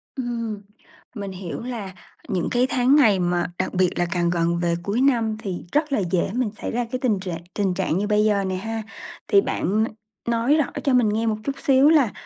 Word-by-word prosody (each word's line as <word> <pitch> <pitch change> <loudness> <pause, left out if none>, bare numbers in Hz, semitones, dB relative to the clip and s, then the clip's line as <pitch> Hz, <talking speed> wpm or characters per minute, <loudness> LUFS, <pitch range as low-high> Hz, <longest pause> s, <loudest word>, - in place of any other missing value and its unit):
Ừm, 230 -5 -3 0.5
mình 200 -3 -5
hiểu 185 -2 -6
là 230 -6 -5 0.3
những 180 -3 -1
cái 245 +1 +3
tháng 255 +2 +3
ngày 220 -10 +5
mà 175 -1 0
đặc 185 - -1
biệt 185 -1 +3
là 175 - +2
càng 175 -1 +1
gần 170 0 +1
về 170 -1 +1
cuối 205 +6 0
năm 230 -5 +2
thì 190 -5 -5
rất 300 0 +1
là 275 - +2
dễ 180 - +1
mình 245 -2 0
xảy - - -3
ra 240 +1 -1
cái 255 - -2
tình 230 -7 +1
trạng 175 -3 -5
tình 195 -3 0
trạng 180 -2 0
như 205 +2 -1
bây 210 0 +3
giờ 205 -2 +2
nè 190 -1 -2
ha, 225 +3 -4 0.4
thì 400 - +5
bạn 215 - 0
n - - 0 0.4
nói 235 +5 +3
rõ 305 -3 +3 0.2
cho 275 - +2
mình 245 -4 +4
nghe 220 +2 0
một 215 -1 0
chút 275 +2 -2
xíu 270 +1 +5
là 290 -9 +4
215 Hz, 225 wpm, -23 LUFS, 185-245 Hz, 0.5 s, ngày